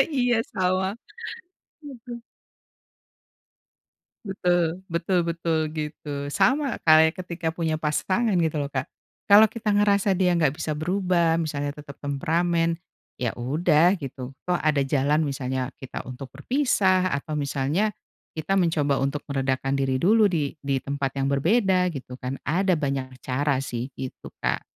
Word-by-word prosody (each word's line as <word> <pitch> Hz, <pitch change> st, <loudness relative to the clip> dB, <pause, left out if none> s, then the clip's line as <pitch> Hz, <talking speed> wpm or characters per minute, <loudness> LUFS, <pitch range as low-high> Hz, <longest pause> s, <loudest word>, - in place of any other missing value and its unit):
Iya, 245 Hz, -2 st, +3 dB, 0.2 s
sama. 185 Hz, +1 st, +1 dB, 0.9 s
Aduh. 240 Hz, -3 st, -9 dB, 2.0 s
Betul, 180 Hz, -2 st, 0 dB
betul 175 Hz, +1 st, 0 dB
betul 165 Hz, -1 st, -1 dB, 0.2 s
gitu. 150 Hz, -2 st, -5 dB
Sama 275 Hz, -, +2 dB
kayak 160 Hz, +2 st, +6 dB
ketika 170 Hz, -2 st, -3 dB
punya 160 Hz, -1 st, -1 dB
pasangan 185 Hz, +8 st, 0 dB
gitu 160 Hz, -2 st, +1 dB
loh, 140 Hz, -, -4 dB
Kak. 130 Hz, -2 st, -2 dB, 0.4 s
kalo 210 Hz, +2 st, +8 dB
kita 220 Hz, -2 st, -1 dB
ngerasa 200 Hz, -1 st, +3 dB
dia 180 Hz, -1 st, +2 dB
nggak 150 Hz, -4 st, +2 dB
bisa 155 Hz, -2 st, -2 dB
berubah, 175 Hz, -1 st, +1 dB
misalnya 145 Hz, -2 st, -2 dB
tetep 140 Hz, -1 st, -11 dB
temperamen, 165 Hz, +4 st, +1 dB, 0.4 s
ya 120 Hz, -3 st, -1 dB
udah 155 Hz, +8 st, +3 dB
gitu, 135 Hz, -4 st, -7 dB, 0.2 s
toh 180 Hz, -1 st, +1 dB
ada 150 Hz, -2 st, +2 dB
jalan 145 Hz, +3 st, +2 dB
misalnya 130 Hz, -1 st, -3 dB
kita 130 Hz, -, -7 dB
untuk 130 Hz, +1 st, -8 dB
berpisah, 190 Hz, -, +2 dB
atau 140 Hz, +2 st, -3 dB
misalnya 145 Hz, +8 st, 0 dB, 0.5 s
kita 155 Hz, +4 st, -1 dB
mencoba 150 Hz, -5 st, +1 dB
untuk 140 Hz, +2 st, -2 dB
meredakan 135 Hz, -1 st, -1 dB
diri 135 Hz, -1 st, +1 dB
dulu 215 Hz, +7 st, +5 dB
di 150 Hz, -5 st, -1 dB
di 140 Hz, -1 st, 0 dB
tempat 140 Hz, -1 st, -3 dB
yang 135 Hz, -, +1 dB
berbeda 185 Hz, -, +3 dB
gitu 125 Hz, -1 st, -8 dB
kan, 130 Hz, +1 st, -4 dB
ada 185 Hz, +4 st, +2 dB
banyak 135 Hz, -3 st, -2 dB, 0.2 s
cara 140 Hz, +2 st, +1 dB
sih 125 Hz, -2 st, -4 dB
gitu, 130 Hz, -1 st, -7 dB
Kak. -, -, -1 dB
160 Hz, 135 wpm, -25 LUFS, 140-185 Hz, 2.0 s, kalo